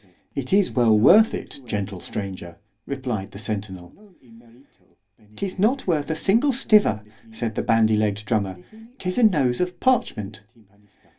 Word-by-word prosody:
It 135 -2 -5
is 195 -1 +3
well 115 -4 +3
worth 210 - +6
it, - - -8
gentle 100 -3 -4
stranger, 95 -5 -7 0.3
replied 125 -8 -4
the - - -9
centinel. 100 -4 -6 1.4
——'Tis 195 -1 -5
not 245 +7 +1
worth 150 -6 -1
a 160 - -1
single 225 - +2
stiver, 215 - +3 0.3
said 110 0 -4
the - - -2
bandy 110 -1 +3
legg'd 105 -1 -1
drummer——'tis 180 - -4
a - - +3
nose 145 - +3
of 180 -1 -3
parchment. 110 - 0
120 Hz, 135 wpm, -23 LUFS, -, 1.4 s, worth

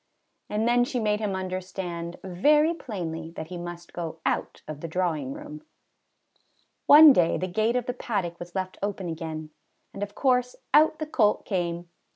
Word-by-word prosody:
And 215 +2 0
then 245 0 +4
she 245 0 -2
made 210 -2 +1
him 205 -3 -2
understand 185 -2 -5
very 295 - +3
plainly 165 - -5
that 160 - -6
he 180 - -6
must 175 0 -8
go 165 -2 -5
out - - -2
of 150 -1 -7
the 165 - -4
drawing 175 - -1
room. 300 +1 -8 1.3
One 300 0 +10
day 170 -7 +3
the 185 - -2
gate 215 +6 0
of 250 -2 0
the 250 - -2
paddock 195 -9 -3
was 175 +1 -9
left 185 -1 -3
open 200 -2 -3
again, 160 -2 -5 0.4
and 195 - -8
of 205 0 -4
course 250 -2 +1 0.2
out 310 +1 +5
the 310 - -3
colt 220 -8 +2
came. 175 -2 -2
190 Hz, 175 wpm, -26 LUFS, 175-245 Hz, 1.3 s, One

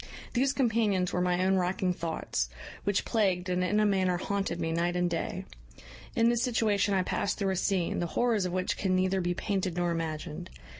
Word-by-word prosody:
These 260 +2 +2
companions 220 -8 +1
were 180 - +1
my 180 0 +1
own 190 0 +3
racking 180 0 0
thoughts, 160 - -2 0.4
which 200 -1 +1
plagued 190 -5 +1
and 180 0 +1
in 205 +3 +2
a 215 - +4
manner 190 -3 +2
haunted 195 -2 -2
me 165 -1 -1
night 170 +2 0
and 180 0 +2
day. 170 -1 -3 0.7
In 230 - +4
this 235 -1 +2
situation 215 -5 +2
I 185 - +2
past 195 +2 -1
through 195 -2 0
a - - 0
scene, 185 -1 0
the 175 - -1
horrors 225 -6 +2
of - - -4
which 185 0 -1
can 190 -2 +1
neither 185 +1 +1
be 175 0 -1
painted 190 -3 -2
nor 175 -1 +1
imagined. 160 - -4
185 Hz, 200 wpm, -29 LUFS, 175-205 Hz, 0.7 s, a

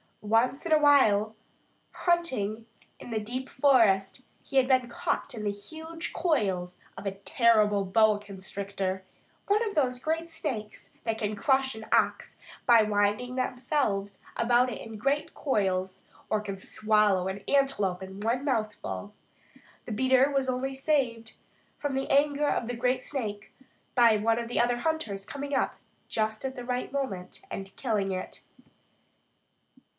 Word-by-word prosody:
Once 230 +7 +1
while 280 -10 +4 0.6
hunting 255 - 0 0.3
in - - -10
the 225 -2 -1
deep 250 +5 -5
forest 235 -6 +3 0.2
he 275 - -3
had 260 -1 +5
been 255 -2 +3
caught 240 - -2
in 220 -3 -6
the 205 - 0
huge 320 +10 -7
coils 195 - 0 0.2
of - - -8
a 195 - 0
terrible 210 0 +3
boa 215 +2 +4
constrictor, 195 -1 -4 0.4
one 420 +3 +3
of 410 - -5
those 250 -4 +1
great 325 +4 -2
snakes 220 -10 -5
that 225 -1 -1
can 210 -1 -2
crush 265 +3 +1
an 220 0 -8
ox - - +1 0.3
by 235 -2 +7
winding 210 +4 +1
themselves 245 -6 -1 0.2
about 240 +2 +3
it - - -6
in 225 -1 -8
great 275 +7 -1
coils, 190 -8 -1 0.2
or 215 - +2
can 200 -2 -5
swallow 210 -2 +2
an 195 +1 -5
antelope 210 -10 +1
at 190 0 -7
one 225 +7 -2
mouthful. 215 -4 -2 0.7
The - - -7
beater 260 +4 +3
was 270 -2 0
only 265 +1 -2
saved 260 -6 0 0.4
from 285 -2 -2
the 270 - -2
anger 290 +1 +3
of 230 - -1
the 245 - -3
great 250 +2 0
snake 210 -7 -4 0.4
by 235 -3 +6
one 225 +2 +1
of 235 - -4
the 240 - -1
other 240 0 +2
hunters 240 -10 -2
coming 285 +3 -6
up 270 - +1 0.3
just 220 +2 -1
at 265 0 -3
the 245 -2 -7
right 250 0 -2
moment 205 -11 -4
and 195 0 -6
killing 210 -6 -1
it. 185 0 -5
230 Hz, 150 wpm, -28 LUFS, 205-270 Hz, 0.7 s, by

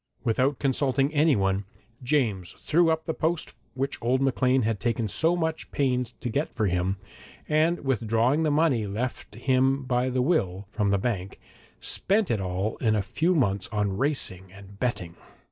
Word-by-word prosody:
Without 130 +4 +1
consulting 135 +1 +1
anyone, 100 -11 +2 0.4
James 120 -9 0
threw 165 +1 +2
up 160 0 0
the 160 - -1
post 160 +1 -2 0.2
which 135 +2 -3
old 125 +3 +2
Maclean 130 -1 +2
had 110 -2 0
taken 115 -2 -1
so 165 - +2
much 160 -2 -2
pains 125 -3 0
to 125 - -2
get 140 +7 -1
for 110 - +1
him, 90 +1 0 0.5
and 160 +3 +2
withdrawing 120 +3 +2
the 160 - +2
money 145 -8 +2
left 110 +1 -4
him 130 +3 +2
by 125 0 0
the 125 0 0
will, 100 - 0
from 105 -2 0
the 100 - +3
bank, 95 -3 -3 0.4
spent 205 - +1
it 110 -4 0
all 95 +3 -2
in 110 -3 +1
a 105 - 0
few 165 - 0
months 100 - +1
on 105 -2 -1
racing 95 -8 -1
and 100 +1 -14
betting. 90 -9 -2
125 Hz, 165 wpm, -26 LUFS, 100-145 Hz, 0.5 s, the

